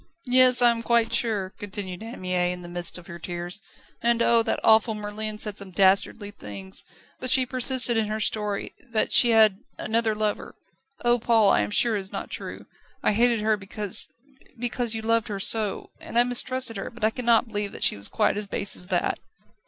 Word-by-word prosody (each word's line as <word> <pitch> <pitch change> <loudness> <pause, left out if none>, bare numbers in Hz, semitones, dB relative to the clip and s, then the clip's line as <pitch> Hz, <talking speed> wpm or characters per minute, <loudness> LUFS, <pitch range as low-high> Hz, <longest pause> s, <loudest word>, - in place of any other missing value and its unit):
"Yes; 255 0 +7
I 240 - +7
am 230 -1 -3
quite 230 0 +1
sure," 210 -5 -1
continued 190 -2 -7
Anne 225 +2 -9
Mie, 180 -1 -1
in 180 0 -8
the - - -10
midst 175 0 0
of 180 - -13
her 170 0 -10
tears. 175 +3 -6 0.4
"And 235 0 +1
oh! 235 -1 +4
that - - -2
awful 220 0 +3
Merlin 210 +1 -4
said 210 -1 -1
some 200 -1 -9
dastardly 195 +2 +1
things. 100 - -9 0.4
But 255 - 0
she 260 -2 +4
persisted 250 -1 +3
in 220 -1 0
her 215 +1 -4
story, 210 -1 -3 0.2
that 220 - -1
she 240 - +6
had 220 -4 +4 0.2
another 220 0 -1
lover. 210 -1 -3 0.5
Oh, 240 0 +3
Paul, 225 -3 +3
I - - +2
am 105 - -3
sure 230 - +1
it - - -1
is 190 - -8
not - - -7
true. - - -8 0.4
I - - +2
hated 235 +1 +2
her 215 0 +1
because 205 0 +3 0.5
because 240 -1 -3
you 220 - -5
loved 230 0 0
her 200 -2 -5
so, 210 0 +1
and 230 - -6
I 240 - +6
mistrusted 245 -1 -2
her, 195 - -6
but 235 -1 -13
I 220 - +2
cannot 235 -1 +1
believe 205 -2 -3
that - - -7
she - - +2
was 100 0 0
quite 210 -2 0
as 210 -1 -3
base 195 - 0
as 180 - -2
that." 180 -3 -1
215 Hz, 205 wpm, -24 LUFS, 195-235 Hz, 0.5 s, Yes